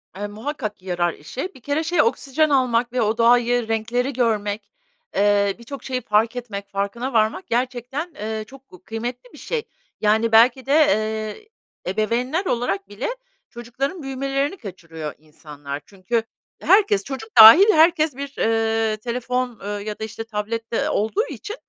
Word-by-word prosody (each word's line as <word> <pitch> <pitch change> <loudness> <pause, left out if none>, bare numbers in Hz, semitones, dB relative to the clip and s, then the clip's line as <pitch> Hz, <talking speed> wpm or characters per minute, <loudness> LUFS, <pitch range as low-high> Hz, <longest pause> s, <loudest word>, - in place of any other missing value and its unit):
Eee, 205 +2 -4
muhakkak 215 -1 -5
yarar 175 -2 -1
işe. 265 - -7
Bir 260 - -16
kere 290 +5 -1
şey, 345 -1 +2
oksijen 300 +2 +1
almak 245 -3 +1
ve 250 - +1
o 220 +1 +1
doğayı, 240 0 +3
renkleri 235 +4 -1
görmek, 215 -4 -1 0.5
eee, 200 -1 +3
birçok 275 +4 -9
şeyi 255 -1 -3
fark 225 +2 +1
etmek, 200 -5 -6
farkına 200 +7 -3
varmak 215 -4 +1
gerçekten, 255 +6 -2
eee, 220 +1 -4
çok 270 0 -16
gu 180 0 -16
kıymetli 240 - -6
bir - - -13
şey. 470 -3 -3 0.4
Yani, 220 +2 +2
belki 240 +3 +5
de, 275 - +1 1.1
ııı, 185 - -2
ebeveynler 245 - -1
olarak 200 - -1
bile 205 0 -4 0.4
çocukların 265 +8 -5
büyümelerini 275 +4 -2
kaçırıyor 165 - -8
insanlar. 150 -2 -9
Çünkü 210 +4 -2 0.4
herkes, 410 0 +4
çocuk 260 -5 -7
dâhil 325 - +11
herkes 320 -2 +4
bir, 280 +1 -7
ııı, 225 -1 +1
telefon, 245 +1 -3
eee, 200 - -5 0.2
ya 210 - -5
da - - -4
işte 220 +1 -6
tablette, 225 +1 -4
ııı, 305 +2 0
olduğu 295 - 0
için, 425 0 -7
235 Hz, 150 wpm, -22 LUFS, 210-270 Hz, 1.1 s, dâhil